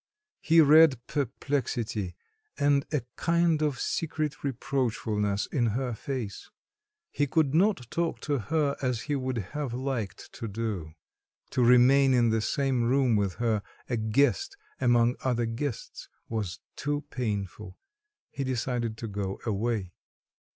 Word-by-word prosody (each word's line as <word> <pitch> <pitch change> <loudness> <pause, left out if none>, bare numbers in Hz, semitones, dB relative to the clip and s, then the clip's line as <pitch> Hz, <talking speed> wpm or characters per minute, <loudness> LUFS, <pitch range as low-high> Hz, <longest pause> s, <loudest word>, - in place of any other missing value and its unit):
He 165 +1 +5
read 155 -3 +7
perplexity 120 -8 -2 0.4
and 140 0 +2
a 150 -6 0
kind 170 -1 +2
of 145 -5 0
secret 155 -2 -2
reproachfulness 115 -6 -1
in 120 -5 +2
her 130 -2 -2
face. 120 -2 -5 0.6
He 145 - 0
could 145 -1 +2
not 185 - +3
talk 170 -1 -1
to 145 -3 0
her 150 +3 0
as 125 -4 0
he 145 -1 -2
would 130 -2 -2 0.2
have 145 -5 -3
liked 130 -6 -4
to 115 - -5
do; 100 -7 -4 0.6
to 125 - +2
remain 130 +2 +6
in 120 -2 +4
the 110 0 +1
same 130 +1 0
room 130 -1 +3
with 100 -3 0
her, 115 -3 0 0.3
a 120 - -1
guest 140 - +1 0.2
among 120 -1 +3
other 120 -2 +1
guests, 115 +2 -5 0.2
was 105 -7 -3 0.2
too 145 +1 -2
painful; 105 -4 -4 0.5
he 140 - -3
decided 120 -3 -2
to 115 - -5
go 100 -2 -4
away. 105 -4 -1
125 Hz, 135 wpm, -28 LUFS, 110-140 Hz, 0.6 s, read